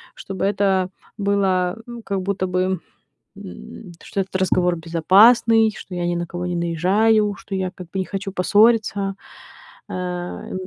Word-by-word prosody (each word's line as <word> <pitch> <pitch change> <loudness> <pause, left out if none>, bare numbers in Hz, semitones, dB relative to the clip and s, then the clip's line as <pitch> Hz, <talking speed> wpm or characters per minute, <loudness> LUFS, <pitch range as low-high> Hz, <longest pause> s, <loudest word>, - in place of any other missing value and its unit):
чтобы 195 -1 -4
это 195 -2 +1 0.3
было, 195 -2 +1
э, 240 -1 -8
как 195 -1 -2
будто 190 -1 -1
бы 185 0 0 0.6
м, 185 - -10
что 200 - -2
этот 190 0 -8
разговор 180 -1 +2
безопасный, 215 +8 +5
что 190 - -10
я 175 0 -2
ни 175 - 0
на 175 0 -2
кого 175 +1 -5
не 175 - -2
наезжаю, 200 +6 +2
что 200 - -10
я 190 -1 -1
как 180 -1 -10
бы 190 - -3
не 185 - -1
хочу 195 +1 -5
поссориться? 205 +1 +2 0.8
Э. 180 -1 -5
190 Hz, 150 wpm, -21 LUFS, 180-200 Hz, 0.8 s, безопасный